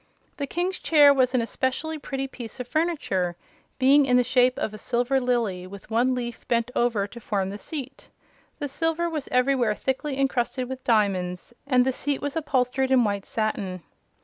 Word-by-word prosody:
The 280 - -3
King's 355 +5 -2
chair 290 -3 +6
was 255 -1 +2
an 240 - +2
especially 265 +7 -2
pretty 270 -1 -3
piece 245 -2 -9
of 250 - -5
furniture, 245 - 0 0.4
being 275 +2 +5
in 250 -1 +4
the 250 - +4
shape 250 +1 +3
of 215 - -2
a 215 - -8
silver 245 +5 +1
lily 230 -8 -1
with 200 +3 -12
one 245 +3 +2
leaf 240 -1 -5
bent 235 0 0
over 235 -4 +1
to 235 +4 -10
form 195 -4 -2
the 205 - -7
seat. 275 -1 -7 0.5
The 290 - -3
silver 325 +4 -1
was 310 -4 -4
everywhere 250 -4 +2
thickly 265 +3 -2
encrusted 255 -1 0
with 260 0 -7
diamonds 195 -3 0
and 250 -2 +4
the 265 - +1
seat 285 +2 -1
was 285 +1 -4
upholstered 265 -4 0
in 260 -2 +5
white 200 -2 -2
satin. 200 -5 -2
250 Hz, 180 wpm, -25 LUFS, 225-275 Hz, 0.5 s, chair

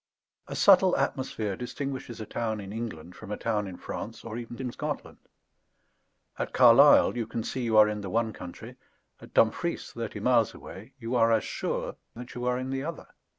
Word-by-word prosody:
A - - -6
subtle 190 -2 +6
atmosphere 110 -7 -2
distinguishes 130 0 -5
a 110 - -5
town 110 0 -3
in 100 0 -7
England 90 -7 -6
from 110 - -11
a 105 - -2
town 105 -3 -1
in 90 -2 -8
France, 110 +3 -7
or 115 -1 -6
even 120 0 -7
in 130 -2 -3
Scotland. - - -5 1.2
At - - -3
Carlisle - - +7
you 115 -3 -2
can 115 0 -3
see 130 - -3
you 115 -2 +1
are 105 0 +8
in 105 -1 -3
the 100 - -5
one 110 +2 0
country; 90 -2 -10 0.4
at - - -14
Dumfries, - - +1
thirty - - -5
miles - - +2
away, - - -11
you 115 +2 -5
are 115 -2 +4
as 110 -1 +3
sure - - -3 0.2
that 120 +2 -9
you 125 0 -5
are 125 0 +1
in 130 +1 -4
the 135 0 -2
other. 165 0 -6
115 Hz, 195 wpm, -28 LUFS, 105-125 Hz, 1.2 s, are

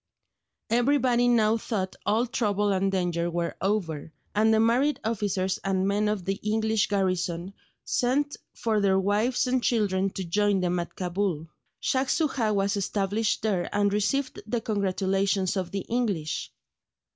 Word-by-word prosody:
Everybody 245 0 +3
now 225 -2 +3
thought 195 -5 -3
all 220 +4 +3
trouble 210 -4 0
and 195 +1 +1
danger 175 -2 0
were 170 0 -2
over, 170 -7 -1 0.2
and 220 +2 +3
the 220 - +4
married 245 +6 +2
officers 200 -4 -1
and 190 -1 0
men 205 +1 +1
of 210 -4 -2
the 195 +1 -2
English 220 0 +1
garrison 185 -2 -1 0.3
sent 285 +4 0 0.2
for 220 -2 0
their 195 -1 +3
wives 210 +7 +1
and 255 0 +1
children 195 -5 +1
to 190 - -4
join 200 +3 +1
them 180 -1 0
at 170 - -6
Cabul. 180 -3 -2 0.3
Shaj 260 0 +1
Soojah 270 -9 +1
was 200 +1 +1
established 205 +3 -1
there 195 -5 0
and 205 -1 +1
received 255 +7 0
the 235 +2 0
congratulations 195 -2 0
of 185 -3 -2
the 195 - -3
English. 205 -11 -2
205 Hz, 145 wpm, -27 LUFS, 190-225 Hz, 0.3 s, the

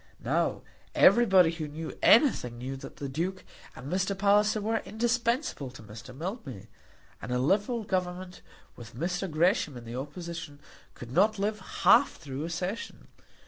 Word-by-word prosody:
Now, - - 0 0.3
everybody 190 -8 +6
who 165 -2 -5
knew 155 +2 -7
anything 220 - +4
knew 130 +3 -5
that - - -10
the 140 - -5
Duke 175 +7 -3 0.3
and 125 - -10
Mr. 190 +1 0
Palliser 205 +2 +3
were 220 +2 0
indispensable 235 - -1
to 125 - -13
Mr. 110 +4 -11
Mildmay. 145 - -6 0.5
And 125 - -6
a 125 - +1
liberal 205 - +1
Government, 185 -1 -3 0.3
with 115 -2 -12
Mr. 180 +6 -2
Gresham 155 -3 +1
in 120 - -10
the 115 +1 -7
opposition, 150 +2 -7 0.4
could 120 -1 -10
not 210 +8 +3
live 210 +2 -1 0.2
half 190 - +6
through 145 -1 -6
a - - -5
session! 180 +6 -5
180 Hz, 150 wpm, -28 LUFS, 135-205 Hz, 0.5 s, everybody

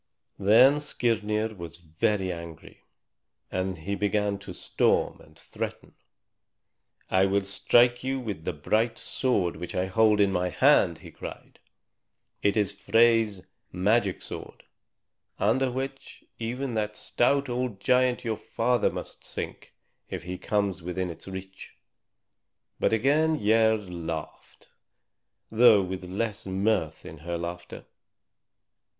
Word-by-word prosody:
Then 120 +9 +6
Skirnir 110 -5 0
was 85 -3 -9
very 95 +4 -1
angry, 85 -2 -11 0.7
and 95 0 -2
he 95 +6 -4
began 100 0 0
to 100 - -9
storm - - 0
and - - -19
threaten. - - -6 1.2
"I 95 +1 +4
will 100 +1 +2
strike 120 +5 +3
you 135 0 -1
with 105 -10 -5
the 90 - -1
bright 110 +9 0
sword 100 -11 -1
which 90 +2 -6
I 90 - +1
hold 105 +2 +3
in 100 -1 +4
my 90 -1 0
hand!" - - +4
he - - -10
cried. - - -10 0.8
"It 100 +1 +2
is 105 -2 +1
Frey's 110 -1 +3 0.3
magic 100 +1 +1
sword, - - -9 0.7
under 130 +2 +2
which 135 +2 -6 0.2
even 125 +3 -3
that 105 -1 -2
stout 140 +3 +1
old 125 -4 -3
giant 125 +3 +2
your 110 -2 -1
father 120 0 +1
must - - -6
sink - - -7 0.3
if 90 -3 -5
he 90 +1 -6
comes 100 -3 -1
within 90 +1 -3
its 85 - -12
reach." 95 0 -9 1.0
But - - +2
again 150 +8 +2
Gerd 110 -4 +2
laughed, 80 -2 -7 0.8
though 110 -3 +6
with 95 0 -5
less 105 +3 -3
mirth 95 -4 0
in 80 - -10
her 85 +2 -4
laughter. 85 +1 -7
105 Hz, 125 wpm, -27 LUFS, 90-115 Hz, 1.2 s, Then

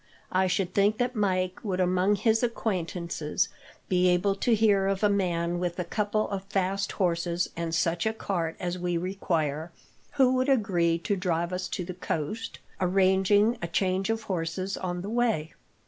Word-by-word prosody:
I 185 +1 +2
should 185 0 -1
think 205 +2 +3
that 250 +1 -1
Mike 185 -3 0
would, 190 -4 -2
among 185 +2 +3
his 220 +2 +2
acquaintances, 180 -5 -1 0.4
be 180 0 +3
able 180 +3 +2
to 225 +4 +2
hear 205 -3 +3
of 195 +1 -1
a 210 - +5
man 175 -3 0
with 175 -1 -2
a 180 - -1
couple 210 +4 -1
of 195 -1 -3
fast 195 0 -1
horses 175 -1 0
and 165 -1 -2
such 170 +4 +1
a 220 - 0
cart 170 -7 -2
as 180 0 -3
we 175 -1 -1
require, 165 -4 -2 0.4
who 265 -3 +4
would 255 +2 +1
agree 175 -10 +2
to 200 +4 -1
drive 175 -2 -1
us 185 0 -2
to 180 - -4
the 180 - -5
coast, 180 +6 -4 0.2
arranging 195 +4 +3
a 170 - -2
change 190 +3 0
of 225 0 -1
horses 185 +1 -2
on 175 -1 -3
the 200 - -5
way. 225 -10 0
185 Hz, 175 wpm, -27 LUFS, 175-205 Hz, 0.4 s, a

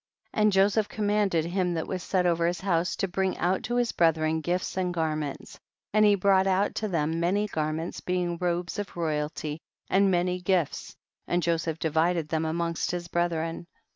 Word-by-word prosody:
76. - - 0
And 210 0 +5
Joseph 200 +2 +3
commanded 205 -6 +1
him 180 0 0
that 160 - -2
was 185 -1 -4
set 180 0 0
over 170 -1 +2
his 175 +1 -2
house 175 -2 0
to 195 - -1
bring 190 +1 -1
out 180 +2 +1
to 240 - -2
his 245 -1 +1
brethren 160 -1 +2
gifts 175 +3 -2
and 185 -1 0
garments, 155 -4 -3 0.3
and 215 0 +5
he 205 -1 +6
brought 195 0 +3
out 195 +2 +2
to 215 - -2
I 170 -6 0
hem 160 +2 -1
many 195 +5 +1
garments 160 -2 -3
being 175 -2 -1
robes 175 +2 -1
of 205 -3 -6
royalty 155 -1 -2 0.3
and 195 +1 +4
many 180 0 +1
gifts, 180 -4 -1 0.3
and 175 0 0
Joseph 165 -1 0
divided 160 0 +1
them 160 0 0
amongst 170 +1 -1
his 175 -1 -3
brethren. 170 0 -1
175 Hz, 185 wpm, -27 LUFS, 165-190 Hz, 0.3 s, he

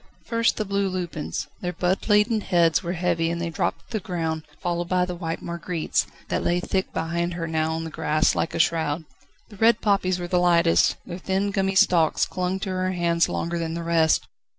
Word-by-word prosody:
First 230 -1 +1
the 215 - -1
blue 200 0 0
lupins: 175 -4 -4 0.2
their 180 -1 -2
bud 185 +5 -1
laden 210 +1 +4
heads 170 -4 +3
were 175 -2 -3
heavy 170 -2 0
and 170 0 -2
they 170 -1 -3
dropped - - -2
to - - -25
the 220 - -1
ground, 165 -4 -2 0.2
followed 175 -1 -2
by 180 -1 +2
the 180 - -4
white 165 -2 -4
marguerites, 170 -1 -1 0.2
that - - -1
lay 175 +1 +1
thick 190 +1 -2
behind 170 +1 -2
her 170 -1 -3
now 160 -1 0
on 165 0 -3
the 160 - -6
grass 155 +1 +1
like - - -2
a - - -1
shroud. 160 -1 +1 0.4
The 205 - -13
red 230 +2 +4
poppies 195 -3 +1
were 175 -1 -4
the 180 0 +2
lightest, 170 - +4
their 175 0 -7
thin 195 +2 -1
gummy 195 -1 0
stalks 170 -4 +4
clung 185 +1 -2
to 195 - -3
her 185 0 -1
hands 170 -1 +2
longer 170 +1 -2
than 165 0 -3
the 170 - -4
rest. 165 -1 +2
175 Hz, 210 wpm, -24 LUFS, 165-190 Hz, 0.4 s, laden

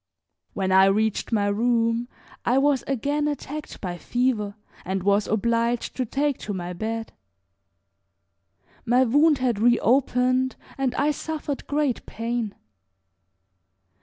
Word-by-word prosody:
When 190 -1 -1
I 190 0 +7
reached 215 +3 +1
my 210 -3 +2
room 230 +2 +1 0.4
I 245 +2 +2
was 275 -1 +3
again 285 +3 0
attacked 295 +1 -5
by 175 -2 -4
fever 235 -5 -1 0.3
and 190 0 -2
was 200 +1 +2
obliged 235 +2 0
to 255 -2 -2
take 285 +2 0
to 205 - -4
my 180 -1 -4
bed. 225 +4 -4 1.7
My 250 +2 +4
wound 290 +5 +4
had 245 -5 0
reopened 250 +2 +2 0.2
and 265 -2 -1
I 290 +2 +2
suffered 300 -1 -4
great 290 -4 0
pain. 230 -2 -3
240 Hz, 120 wpm, -24 LUFS, 215-270 Hz, 1.7 s, I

